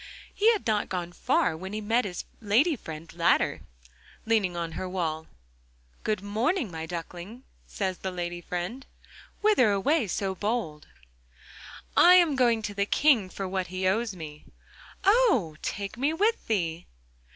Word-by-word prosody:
He 440 Hz, +3 st, +4 dB
had 425 Hz, -, -4 dB
not 215 Hz, -2 st, 0 dB
gone 175 Hz, -2 st, -3 dB
far 175 Hz, -1 st, +1 dB
when 190 Hz, +5 st, -7 dB
he 215 Hz, -, -2 dB
met 225 Hz, +3 st, +1 dB
his 180 Hz, -3 st, -5 dB, 0.2 s
lady 240 Hz, -, +3 dB
friend 160 Hz, -, -9 dB
Ladder, 170 Hz, 0 st, +2 dB, 0.6 s
leaning 210 Hz, -6 st, +1 dB
on 170 Hz, -1 st, -3 dB
her 185 Hz, +3 st, -5 dB
wall. 160 Hz, -4 st, -2 dB, 0.8 s
'Good 210 Hz, -3 st, -1 dB
morning, 230 Hz, -, 0 dB
my 160 Hz, -1 st, -5 dB
duckling,' 175 Hz, +7 st, -7 dB, 0.2 s
says 190 Hz, -3 st, -3 dB
the 190 Hz, -, -3 dB
lady 175 Hz, -1 st, -4 dB
friend, 180 Hz, +10 st, -5 dB, 0.5 s
'whither 415 Hz, -, +4 dB
away 235 Hz, +6 st, +2 dB
so 195 Hz, +1 st, -2 dB
bold?' 195 Hz, -7 st, -3 dB, 1.1 s
'I 360 Hz, +1 st, +8 dB
am 340 Hz, -5 st, +5 dB
going 235 Hz, -4 st, +3 dB
to 205 Hz, -, -3 dB
the 200 Hz, 0 st, -1 dB
King 250 Hz, -10 st, +3 dB
for 195 Hz, +1 st, -5 dB
what 185 Hz, -1 st, -2 dB
he 185 Hz, +1 st, -2 dB
owes 215 Hz, +1 st, 0 dB
me.' 150 Hz, -3 st, -9 dB, 0.6 s
'Oh! 390 Hz, -, +3 dB
take 200 Hz, +3 st, -4 dB
me 285 Hz, +4 st, +1 dB
with 425 Hz, +7 st, +1 dB
thee! 170 Hz, -6 st, -1 dB
200 Hz, 150 wpm, -27 LUFS, 175-245 Hz, 1.1 s, I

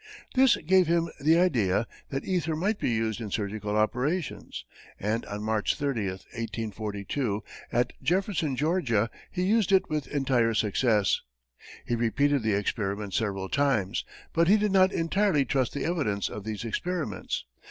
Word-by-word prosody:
This 260 Hz, -1 st, +6 dB
gave 185 Hz, +2 st, +3 dB
him 170 Hz, 0 st, +2 dB
the 160 Hz, +4 st, +4 dB
idea 115 Hz, -, +2 dB, 0.2 s
that 135 Hz, 0 st, -3 dB
ether 170 Hz, -4 st, 0 dB
might 200 Hz, +7 st, 0 dB
be -, -, 0 dB
used 110 Hz, -1 st, -1 dB
in 110 Hz, -, -4 dB
surgical 105 Hz, 0 st, -2 dB
operations, 130 Hz, +9 st, -1 dB, 0.3 s
and 110 Hz, +3 st, -1 dB
on 105 Hz, +1 st, -5 dB
March 110 Hz, -1 st, +1 dB
30, 135 Hz, -9 st, -1 dB
1842, 105 Hz, +2 st, -4 dB, 0.3 s
at 120 Hz, +1 st, +1 dB
Jefferson, 175 Hz, -6 st, 0 dB
Georgia, 125 Hz, -, +1 dB, 0.2 s
he 180 Hz, -, -2 dB
used 210 Hz, +1 st, +2 dB
it 190 Hz, -4 st, +3 dB
with 150 Hz, -3 st, -1 dB
entire 130 Hz, -5 st, +1 dB
success. 105 Hz, -1 st, +2 dB, 0.6 s
He -, -, -2 dB
repeated 135 Hz, +5 st, +2 dB
the 110 Hz, -1 st, +1 dB
experiment 100 Hz, 0 st, -2 dB
several 100 Hz, -3 st, -1 dB
times, 120 Hz, -6 st, +1 dB, 0.3 s
but 165 Hz, 0 st, +3 dB
he 205 Hz, +4 st, +6 dB
did 210 Hz, -1 st, +1 dB
not 190 Hz, 0 st, +5 dB
entirely 165 Hz, -3 st, +2 dB
trust 130 Hz, -1 st, 0 dB
the 145 Hz, -, -2 dB
evidence 140 Hz, -, 0 dB
of 105 Hz, -1 st, -7 dB
these 110 Hz, 0 st, -4 dB
experiments. 155 Hz, -, -3 dB
125 Hz, 150 wpm, -28 LUFS, 105-165 Hz, 0.6 s, This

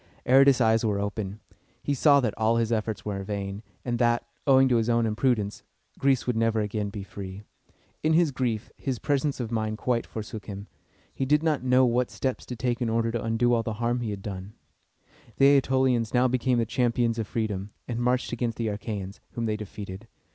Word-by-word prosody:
Aratus' 135 Hz, +1 st, +6 dB
eyes 115 Hz, -1 st, +3 dB
were 105 Hz, -3 st, +1 dB
opened. 100 Hz, 0 st, -3 dB, 0.5 s
He 145 Hz, -, 0 dB
saw 140 Hz, +1 st, +5 dB
that 115 Hz, -5 st, 0 dB
all 110 Hz, +1 st, +2 dB
his 115 Hz, 0 st, 0 dB
efforts 110 Hz, -1 st, -2 dB
were 100 Hz, -2 st, -3 dB
vain, 100 Hz, 0 st, -4 dB, 0.2 s
and 120 Hz, -2 st, -1 dB
that, 120 Hz, -1 st, +2 dB, 0.2 s
owing 135 Hz, -1 st, +6 dB
to 120 Hz, -, +4 dB
his 115 Hz, +1 st, 0 dB
own 115 Hz, -1 st, +3 dB
imprudence, 110 Hz, -2 st, 0 dB, 0.4 s
Greece 135 Hz, -2 st, +2 dB
would 125 Hz, -, 0 dB
never 115 Hz, 0 st, +2 dB
again 105 Hz, 0 st, -2 dB
be 100 Hz, -1 st, -6 dB
free. 95 Hz, 0 st, -8 dB, 0.6 s
In 155 Hz, +1 st, +2 dB
his 165 Hz, -2 st, +4 dB
grief, 120 Hz, -5 st, -2 dB
his 130 Hz, -3 st, -2 dB
presence 140 Hz, +3 st, 0 dB
of 120 Hz, -2 st, -3 dB
mind 110 Hz, -1 st, -1 dB
quite 120 Hz, 0 st, -1 dB
forsook 110 Hz, -1 st, -7 dB
him. 100 Hz, -1 st, -6 dB, 0.5 s
He 135 Hz, -, -2 dB
did 150 Hz, +2 st, +3 dB
not 155 Hz, -5 st, +1 dB
know 130 Hz, 0 st, +4 dB
what 125 Hz, 0 st, +1 dB
steps 130 Hz, -2 st, -3 dB
to 125 Hz, -, -5 dB
take 120 Hz, +1 st, -1 dB
in 120 Hz, -, +1 dB
order 115 Hz, 0 st, +1 dB
to 115 Hz, -1 st, -2 dB
undo 115 Hz, +2 st, +2 dB
all 115 Hz, -, +3 dB
the 115 Hz, -1 st, -3 dB
harm 120 Hz, +3 st, -1 dB
he 120 Hz, -2 st, -3 dB
had 100 Hz, -2 st, -5 dB
done. 95 Hz, 0 st, -6 dB, 0.8 s
The 140 Hz, 0 st, +6 dB
Ætolians 130 Hz, -3 st, +1 dB
now 125 Hz, +1 st, +5 dB
became 125 Hz, 0 st, +1 dB
the 115 Hz, -, +2 dB
champions 120 Hz, 0 st, +1 dB
of 110 Hz, -, -2 dB
freedom, 105 Hz, -3 st, -2 dB, 0.2 s
and 120 Hz, -1 st, -3 dB
marched 125 Hz, +1 st, +1 dB
against 120 Hz, -1 st, -2 dB
the 115 Hz, -2 st, -1 dB
Achæans, 100 Hz, -1 st, -5 dB
whom 115 Hz, -, -2 dB
they 110 Hz, -1 st, 0 dB
defeated. 105 Hz, 0 st, -8 dB
115 Hz, 205 wpm, -27 LUFS, 105-125 Hz, 0.8 s, Aratus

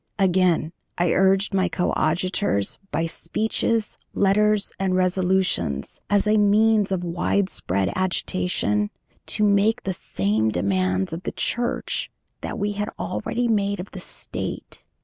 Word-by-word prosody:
Again, 180 Hz, -4 st, +2 dB, 0.2 s
I 175 Hz, -1 st, +2 dB
urged 195 Hz, +1 st, +3 dB
my 185 Hz, -1 st, +2 dB
coadjutors 175 Hz, -, 0 dB
by 165 Hz, +3 st, -1 dB
speeches, 220 Hz, +6 st, -1 dB, 0.2 s
letters, 210 Hz, +1 st, +3 dB
and 190 Hz, -1 st, +1 dB
resolutions, 185 Hz, -, 0 dB
as 205 Hz, 0 st, +3 dB
a 215 Hz, +1 st, +3 dB
means 210 Hz, 0 st, +4 dB
of 185 Hz, -2 st, -1 dB
widespread 170 Hz, -, 0 dB
agitation, 185 Hz, +2 st, 0 dB, 0.4 s
to 215 Hz, -, 0 dB
make 210 Hz, +3 st, +3 dB
the 190 Hz, -, -2 dB
same 110 Hz, -, 0 dB
demands 95 Hz, -, 0 dB
of 165 Hz, -, -4 dB
the -, -, -4 dB
Church 240 Hz, 0 st, -1 dB, 0.3 s
that -, -, -4 dB
we 205 Hz, +1 st, -1 dB
had 205 Hz, +1 st, -3 dB
already 240 Hz, +3 st, -2 dB
made 200 Hz, -3 st, +1 dB
of 180 Hz, -, -7 dB
the 190 Hz, -, -7 dB
State. -, -, -6 dB
190 Hz, 130 wpm, -23 LUFS, 170-205 Hz, 0.4 s, means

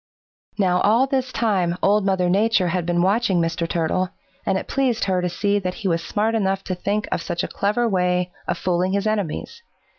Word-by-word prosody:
"Now 180 Hz, -3 st, +2 dB
all 230 Hz, +5 st, +4 dB
this 260 Hz, -1 st, -1 dB
time 190 Hz, -8 st, 0 dB
Old 205 Hz, +1 st, +4 dB
Mother 190 Hz, -2 st, +2 dB
Nature 195 Hz, 0 st, +2 dB
had 175 Hz, 0 st, -1 dB
been 175 Hz, 0 st, +2 dB
watching 195 Hz, -1 st, +2 dB
Mr. 165 Hz, 0 st, -1 dB
Turtle, 175 Hz, +2 st, 0 dB, 0.4 s
and 195 Hz, -1 st, +2 dB
it -, -, -5 dB
pleased 260 Hz, -4 st, 0 dB
her 185 Hz, -2 st, +1 dB
to 180 Hz, -, -1 dB
see 205 Hz, +3 st, 0 dB
that 185 Hz, -2 st, -3 dB
he 215 Hz, -, -4 dB
was 165 Hz, -2 st, 0 dB
smart 220 Hz, +2 st, 0 dB
enough 195 Hz, -3 st, 0 dB
to 185 Hz, -, -3 dB
think 200 Hz, +4 st, -2 dB
of -, -, -1 dB
such 170 Hz, 0 st, -3 dB
a -, -, -2 dB
clever 210 Hz, +4 st, 0 dB
way 180 Hz, -2 st, +1 dB, 0.2 s
of 175 Hz, -, -1 dB
fooling 180 Hz, +1 st, 0 dB
his 200 Hz, +1 st, 0 dB
enemies. 215 Hz, -, -2 dB
190 Hz, 205 wpm, -22 LUFS, 180-210 Hz, 0.4 s, all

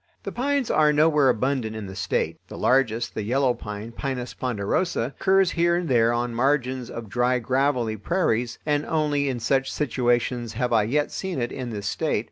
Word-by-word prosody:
The -, -, -4 dB
pines 275 Hz, 0 st, 0 dB
are 150 Hz, 0 st, +4 dB
nowhere 150 Hz, -2 st, +4 dB
abundant 125 Hz, -2 st, 0 dB
in 110 Hz, -2 st, -5 dB
the 95 Hz, 0 st, -8 dB
State. -, -, -1 dB
The -, -, -9 dB
largest, 120 Hz, -3 st, +1 dB
the -, -, -3 dB
yellow 125 Hz, +4 st, +1 dB
pine 105 Hz, 0 st, -7 dB
(Pinus 125 Hz, 0 st, -4 dB
ponderosa), 125 Hz, -, -1 dB
occurs 190 Hz, -1 st, +3 dB
here 170 Hz, 0 st, +2 dB
and 175 Hz, -1 st, -1 dB
there 115 Hz, -3 st, +3 dB
on 120 Hz, 0 st, -1 dB
margins 130 Hz, 0 st, 0 dB
of 115 Hz, -1 st, -7 dB
dry 125 Hz, +4 st, +1 dB
gravelly 125 Hz, -2 st, 0 dB
prairies, 120 Hz, -, 0 dB
and 150 Hz, -1 st, +1 dB
only 145 Hz, -3 st, +1 dB
in 125 Hz, -2 st, -2 dB
such 135 Hz, +3 st, +1 dB
situations 120 Hz, -3 st, 0 dB
have 125 Hz, +1 st, -1 dB
I 110 Hz, -2 st, +4 dB
yet 145 Hz, +6 st, 0 dB
seen 190 Hz, -6 st, -3 dB
it 120 Hz, -1 st, -2 dB
in 130 Hz, -2 st, -5 dB
this 105 Hz, -3 st, -5 dB
State. 150 Hz, +4 st, 0 dB
125 Hz, 185 wpm, -24 LUFS, 115-145 Hz, -, are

